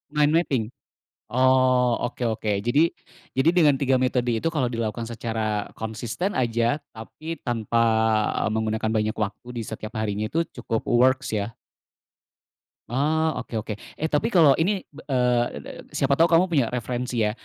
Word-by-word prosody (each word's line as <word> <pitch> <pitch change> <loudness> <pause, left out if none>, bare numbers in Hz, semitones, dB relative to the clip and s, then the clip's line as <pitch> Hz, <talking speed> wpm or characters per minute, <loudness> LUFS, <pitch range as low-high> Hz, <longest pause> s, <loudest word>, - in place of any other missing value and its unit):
mind 150 +1 +3
mapping 140 -9 +1 0.7
Oh, 130 -1 +4
oke 120 - -5
oke. 110 -1 -1
Jadi 145 +9 +2 0.4
jadi 135 +5 +2
dengan 155 -4 +6
3 135 -1 +3
metode 125 -2 +1
itu 165 +9 -1
kalau 130 -6 +1
dilakukan 115 0 -3
secara 110 -3 -2
konsisten 110 - -4
aja 120 +1 +1 0.2
tapi 155 +9 -8
tanpa 115 -1 -1 0.7
menggunakan 110 0 -1
banyak 110 0 0
waktu 105 +3 -4
di 115 - -2
setiap 110 +1 -7
harinya 110 0 -1
itu 165 +5 0 0.2
cukup 115 -1 -2
works 130 +1 +2
ya. 105 +1 -2 1.3
Ah, 155 +5 +1
oke 125 -1 -7
oke. 105 - -5 0.2
Eh, 160 +1 -3
tapi 195 +10 0
kalau 155 -6 +6
ini, 190 +4 +1 0.2
eee, 125 -3 -1
siapa 140 0 +1
tahu 165 - +6
kamu 170 +2 +4
punya 140 -8 +2
referensi 125 -1 -2
ya 105 0 +2
125 Hz, 145 wpm, -24 LUFS, 110-145 Hz, 1.3 s, dengan